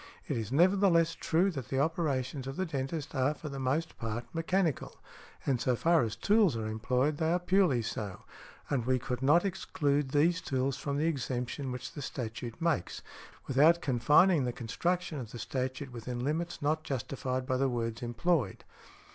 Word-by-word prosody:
It - - -1
is 110 -1 -3
nevertheless 170 +1 +4
true 175 +5 +1
that 135 -8 -6
the 135 - -2
operations 140 -4 -1
of 135 - -5
the 185 - -1
dentist 145 0 -4
are, 140 +1 +1
for 150 - -7
the 140 -1 -6
most 140 +5 -1
part, 115 +1 -3
mechanical, 165 -1 0 0.5
and 130 -4 +1
so 125 - +2
far 165 +5 +3
as 110 -2 -2
tools 205 - +3
are 110 - -3
employed, 125 +7 0
they 160 +1 +1
are 175 - +3
purely 180 -9 +2
so, 105 -3 -5 0.4
and 125 -5 -1
we 130 0 +3
could 125 0 -4
not 150 +7 +4
exclude 145 -7 0
these 165 +5 +2
tools 130 0 -1
from 140 +1 -3
the 150 - +1
exemption 130 -3 -2
which 125 - -6
the 145 - -6
statute 120 -2 -5
makes, 165 - -1 0.4
without 155 +6 +5
confining 145 +6 +4
the 125 - -1
construction 165 +8 -2
of 120 -4 -6
the 120 - -8
statute 130 +3 -3
within 120 +1 -5
limits 165 +2 -2
not 155 +2 +1
justified 130 -1 -3
by 130 0 0
the 135 +1 +2
words 115 -2 -3
employed". 120 - 0
135 Hz, 175 wpm, -31 LUFS, 125-165 Hz, 0.5 s, without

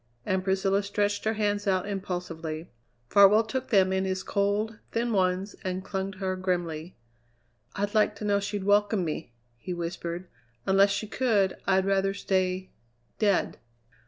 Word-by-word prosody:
And 190 0 0
Priscilla 195 +1 +2
stretched 205 +1 -1
her 220 - +2
hands 205 -1 -1
out 190 0 +1
impulsively. 175 -5 -4 0.4
Farwell 200 - +6
took 255 +4 -3
them 190 -4 +4
in 190 0 +1
his 190 0 -2
cold, 205 +2 0
thin 230 0 0
ones 185 +1 +1
and 185 0 -3
clung 195 0 -3
to - - -15
her 185 -1 -1
grimly. 175 -3 -2 0.8
"I'd 205 0 -2
like 215 -1 +3
to 210 - -6
know 200 -1 +3
she'd 200 0 -3
welcome 205 -1 +3
me!" 155 -4 -4 0.3
he 180 +9 -5
whispered. 170 +1 -4 0.4
"Unless 195 +1 +5
she 200 +2 -1
could, 215 -4 +1
I'd 190 -1 +3
rather 195 0 +1
stay 185 -1 -1 0.5
dead!" 205 -3 +1
195 Hz, 155 wpm, -28 LUFS, 185-205 Hz, 0.8 s, Farwell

